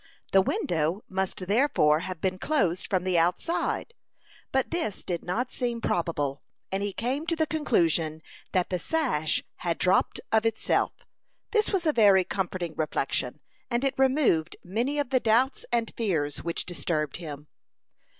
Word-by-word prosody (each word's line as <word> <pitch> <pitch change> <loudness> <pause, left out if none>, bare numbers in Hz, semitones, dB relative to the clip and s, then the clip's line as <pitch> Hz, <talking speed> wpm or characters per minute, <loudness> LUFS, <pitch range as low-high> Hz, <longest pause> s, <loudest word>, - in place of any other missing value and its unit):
The 195 - +6
window 175 +1 0
must 190 -1 -2
therefore 200 - +3
have 180 0 -5
been 185 -1 -1
closed 195 - +1
from 185 -2 0
the 185 -2 +2
outside; 180 - 0 0.6
but 265 0 0
this 330 - -2
did 175 -2 -3
not 235 +8 -2
seem 240 -2 -2
probable, 145 -9 -1 0.3
and 195 +1 -1
he 205 0 -1
came 260 - -2
to 335 - +1
the 320 -1 +2
conclusion 170 - +1 0.3
that 185 -1 0
the 180 - 0
sash 240 - 0
had 170 -2 -1
dropped 185 +1 +2
of 220 0 +4
itself. 225 -1 +1 0.6
This 435 -1 +2
was 380 -4 0
a 310 - +3
very 200 -5 +6
comforting 180 -3 -3
reflection, 145 -3 -1 0.3
and 240 +1 0
it 275 -1 +2
removed 260 - +2
many 235 +10 -1
of 285 -3 -1
the 260 - +4
doubts 245 +4 +2
and 235 -2 0
fears 160 -10 -1
which 170 0 -2
disturbed 155 -5 -2
him. 150 -4 -7
190 Hz, 155 wpm, -27 LUFS, 170-255 Hz, 0.6 s, The